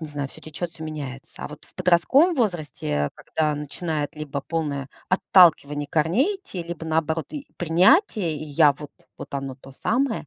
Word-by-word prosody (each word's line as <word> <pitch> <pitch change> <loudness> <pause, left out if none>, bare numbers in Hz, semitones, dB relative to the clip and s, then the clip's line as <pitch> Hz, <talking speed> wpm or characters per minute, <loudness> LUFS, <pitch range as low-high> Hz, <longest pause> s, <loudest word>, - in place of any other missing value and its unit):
не 160 - -6
знаю, 145 -2 -4
всё - - -14
течёт, 155 +3 -4
всё 160 - -9
меняется. 140 -4 -7
А - - -4
вот 150 0 -12
в - - -26
подростковом 185 - +4
возрасте, 150 - -1
когда 155 -2 -1
начинает 150 +1 -3
либо 145 -2 -4
полное 145 -5 -2 0.2
отталкивание 165 -6 +4
корней 190 - +2
идти, 380 - -7
либо 170 -1 -6
наоборот 160 0 0
и 295 -2 -6
принятие, 180 - +3
я 150 0 +3
вот 145 +1 -10 0.3
вот - - -9
оно 135 -1 -3
то 135 +1 -15
самое 235 - -1
160 Hz, 165 wpm, -24 LUFS, 145-180 Hz, 0.3 s, подростковом